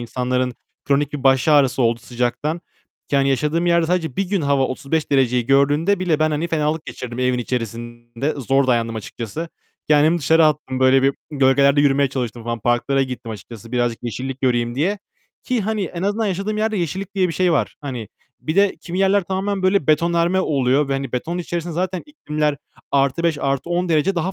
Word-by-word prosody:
insanların 125 +1 -1 0.3
kronik 145 +1 +1
bir 145 -3 -5
baş 135 +3 +4
ağrısı 135 -4 +4
oldu 115 0 +1
sıcaktan. 125 +8 -2 0.5
Yani, 140 0 +3
yaşadığım 150 +6 0
yerde 170 -1 +3
sadece 165 -6 -1
bir 195 -2 -1
gün 195 -3 0
hava 140 -1 +2
35 145 +4 -2
dereceyi 125 -3 +2
gördüğünde 145 +8 +3
bile 170 -5 +1
ben, 155 0 +2
hani, 155 +3 -1
fenalık 155 0 -1
geçirdim 120 -1 -7
evin 125 -1 +1
içerisinde. 120 +2 -4
Zor 135 0 +1
dayandım 115 -2 +1
açıkçası. 115 - -6 0.4
Kendimi 155 +3 +4
dışarı 160 +2 +4
attım. 140 -4 -1
Böyle 130 0 +5
bir 135 0 +3 0.2
gölgelerde 140 0 +4
yürümeye 140 -1 +3
çalıştım 120 -3 -4
falan. 115 0 -3
Parklara 120 +4 +1
gittim 125 -3 -6
açıkçası 115 +2 -10
birazcık 120 -2 0
yeşillik 130 +3 -5
göreyim 120 -2 +1
diye 185 +9 0 0.5
ki, 250 -3 0
hani, 215 0 -1
en 175 0 -6
azından 205 +3 0
yaşadığım 200 +3 -2
yerde 220 0 0
yeşillik 190 +3 -3
diye 185 -2 +2
bir - - -3
şey 180 0 +2
var. 150 - 0
Hani, 125 -7 -6 0.3
bir 155 +4 -3
de 200 -1 +3
kimi 175 +1 -5
yerler 195 +1 +3
tamamen 195 +2 -2
böyle 185 -4 +2
betonarme 170 +4 +2
oluyor 140 -3 +1
ve, - - 0
hani, 135 -2 -3
betonun 165 +8 -2
içerisinde 170 -1 -4
zaten 180 +1 -2
iklimler 150 - -2 0.3
+5, 145 +3 +1
+10 170 +6 -1
derece 160 +4 +2
daha 175 +3 -1
145 Hz, 180 wpm, -20 LUFS, 125-170 Hz, 0.5 s, Böyle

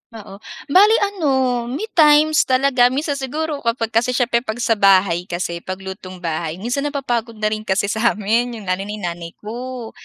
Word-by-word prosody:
Oo, 200 -2 -11 0.3
bale 415 +7 +6
ano 265 -11 0
may 265 - -4
times 305 -1 +5
talaga 255 -1 +3
minsan 280 +2 -2
siguro 295 +3 -3
kapag 230 -2 -2
kasi 240 +3 +1
siyempre 240 -1 +2
'pag 220 -3 -5
sa - - 0
bahay 185 -3 +3
kasi 175 -1 -3
paglutong 185 0 -8
bahay 160 -1 -3
minsan 245 +9 -2
napapagod 240 -5 -3
na 215 0 -1
rin 215 - -2
kasi 200 +1 0
sa 225 +2 +1
amin, 230 +4 0
yung 220 - -9
lalo 190 +1 -2
na 210 - -5
yung 210 - -10
nanay 170 -1 -5
ko. 240 +1 -6
235 Hz, 180 wpm, -19 LUFS, 195-265 Hz, 0.3 s, bale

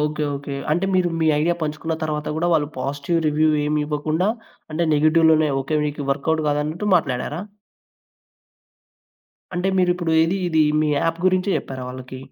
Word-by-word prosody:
Okay. 150 0 -1
Okay. 140 0 -6 0.2
అంటే 175 +4 +1
మీరు 180 -1 +3
మీ 160 - +2
idea 170 +3 +2
పంచుకున్న 155 +2 -2
తరువాత 150 -1 -2
గూడా 175 +2 0
వాళ్ళు 150 -3 +2
పాజిటివ్ 145 +5 -1
రివ్యూ 155 +1 +2 0.2
ఏం 150 +1 0
ఇవ్వకుండా 155 +5 -1 0.4
అంటే 170 +2 0
నెగెటివ్‌లోనే 155 0 +4
ఓకే. 155 +3 -1
మీకు 145 -1 -5
వర్క్‌అవుట్ 155 +3 -1
కాదన్నట్టు 150 +7 -1
మాట్లాడారా? 145 +1 -2 2.1
అంటే 180 +2 0
మీరిప్పుడు 175 -2 +1
ఏది 170 +4 +1
ఇది 160 -2 +3 0.2
మీ 155 - +1
యాప్ 165 0 0
గురించే 185 +1 +2
చెప్పారా 130 -1 -6
వాళ్ళకి? 130 0 -8
155 Hz, 145 wpm, -22 LUFS, 145-170 Hz, 2.1 s, నెగెటివ్‌లోనే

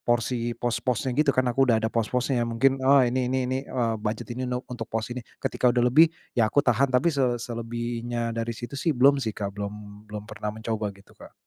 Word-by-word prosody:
porsi 120 0 0
pos-posnya 120 +1 -1
gitu, 140 -3 +2
kan 130 - +3
aku 135 +1 +3
udah 115 - +5
ada 110 - -1
pos-posnya, 125 +3 0
mungkin 130 +3 +2
oh, 135 0 +5
ini 125 +1 0
ini 130 0 0
ini 130 +1 -1
eee, 115 -3 0
budget 105 +3 -3
ini 125 +1 -3
no 125 +1 -3
untuk 115 -2 -6
pos 110 +2 -3
ini. 125 - -5 0.2
Ketika 125 - +1
udah 120 0 +2
lebih, 150 +7 +6 0.2
ya 110 -3 +2
aku 145 +6 +2
tahan. 125 +3 +3
Tapi 130 +6 +2
se 130 -4 +1
selebihnya 120 0 -3
dari 115 0 -3
situ 120 -1 -7
sih 145 +1 -1
belum 140 +2 +5
sih, 110 -5 -3
Kak, 100 -1 -3
belum 105 +1 -8
belum 105 0 -6
pernah 105 -1 -6
mencoba 110 0 -3
gitu, 100 - -20
Kak. - - -15
120 Hz, 215 wpm, -26 LUFS, 115-130 Hz, 0.2 s, lebih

